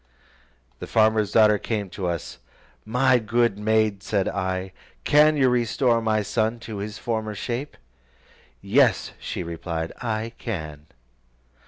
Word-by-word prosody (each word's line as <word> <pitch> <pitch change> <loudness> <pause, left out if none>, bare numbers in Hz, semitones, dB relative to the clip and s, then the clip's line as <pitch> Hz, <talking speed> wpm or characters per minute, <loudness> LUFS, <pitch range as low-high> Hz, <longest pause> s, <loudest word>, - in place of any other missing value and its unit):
The - - -7
farmer's 110 -2 +2
daughter 105 -1 +5
then - - -17
came 105 -4 -3
to 95 -2 -4
us: 85 -3 -4 0.5
"My 125 +2 +3
good 115 -1 +1
maid," 110 -2 +1
said 100 -1 -1
I, 95 -1 -2 0.3
"can 150 +1 +5
you 135 -2 +4
restore 120 0 +2
my 110 -1 +1
son 110 +2 -1
to 110 -3 -7
his 105 +2 -5
former 110 -2 -3
shape?" 120 +8 -4 0.9
"Yes," - - +3
she - - -4
replied, 85 -1 -4
"I 115 -1 -3
can." 75 -9 -6
110 Hz, 135 wpm, -24 LUFS, 100-120 Hz, 0.9 s, daughter